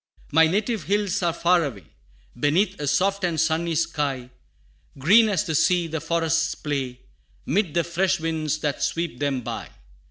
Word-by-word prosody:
"My 160 +2 +5
native 210 - -1
hills 200 +1 0
are 175 -1 +2
far 170 +1 +2
away, 115 - -6 0.5
Beneath 150 +11 +1
a 145 - -2
soft 195 +7 +1
and 170 -3 0
sunny 160 +1 +1
sky; 145 -6 -2 0.7
Green 205 - +5
as 190 -6 +1
the 160 - -3
sea, 175 +3 +3
the 160 -1 -4
forests 165 0 0
play, 135 -4 -4 0.4
'Mid 190 -6 0
the 170 - +3
fresh 185 +2 0
winds 160 -2 -1
that 145 -2 -2
sweep 165 -7 -2
them 140 -3 -1
by. - - -6
165 Hz, 160 wpm, -24 LUFS, 145-180 Hz, 0.7 s, My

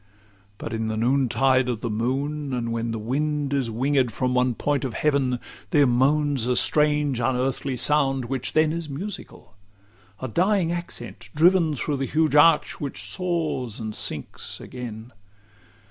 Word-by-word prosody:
LXIII 100 -1 -32
But 115 - -6
in 110 0 -2
the 110 0 -2
noontide 130 +1 +2
of 115 -3 -3
the 120 - -2
moon, 135 +6 -2
and 120 -2 -2
when 115 0 -2
The 115 - -2
wind 145 +5 -1
is 135 -4 0
wingéd 130 +2 +1
from 125 +2 -1
one 125 -1 +2
point 145 +2 0
of 130 -4 -3
heaven, 135 -4 +1 0.3
There 145 -2 +4
moans 135 +1 +2
a 125 - +2
strange 150 -1 +2
unearthly 130 +1 -1
sound, 135 -1 +2
which 130 +1 -3
then 155 0 +3
Is 165 -2 -4
musical 165 - -7 0.7
a 130 - -4
dying 180 - +1
accent 175 0 -6
driven 165 -1 +4
Through 145 +3 -2
the 135 0 -2
huge 155 -2 +1
arch, 150 +1 +4
which 140 -2 -4
soars 160 - -2
and 110 -1 -4
sinks 75 -8 -6
again. 120 -1 -8
135 Hz, 160 wpm, -24 LUFS, 120-150 Hz, 0.7 s, There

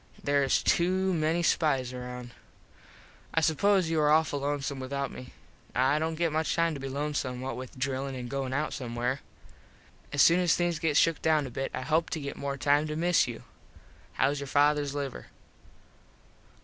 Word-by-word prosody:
There 140 0 +2
is 135 - +2
to 185 +2 +2
many 165 +1 +1
spize 135 -7 +1
around. 125 -1 -7 1.0
I 165 - +4
suppose 180 +2 +2
you 160 - +1
are 150 - +3
awful 155 -2 +3
lonesome 140 -1 -2
without 140 +1 -3
me. 125 - -10 0.4
I 135 +4 +3
dont 160 0 -2
get 170 -1 +1
much 160 +1 0
time 165 -1 +2
to 145 - -6
be 135 0 -5
lonesome 140 -2 -2
what 130 -2 -4
with 130 +1 -8
drillin 135 +1 -2
an 125 -1 -5
goin 135 0 -3
out 150 +3 -1
somewhere. 125 +1 -2 0.9
As 145 -3 +4
soon 170 +2 +6
as 175 -3 +3
things 175 -2 0
get 155 -3 +1
shook 165 -2 +3
down 155 -2 +2
a 130 - -7
bit 135 +3 -3
I - - -4
hope 160 +5 +1
to 160 - -3
get 140 -1 -5
more 140 0 -4
time 145 +3 +2
to 150 - -4
miss 170 -1 +3
you. 120 -2 -7 0.7
Hows 145 +1 +1
your 140 - -5
fathers 145 +1 +2
liver? 140 -2 -5
145 Hz, 185 wpm, -29 LUFS, 135-160 Hz, 1.0 s, soon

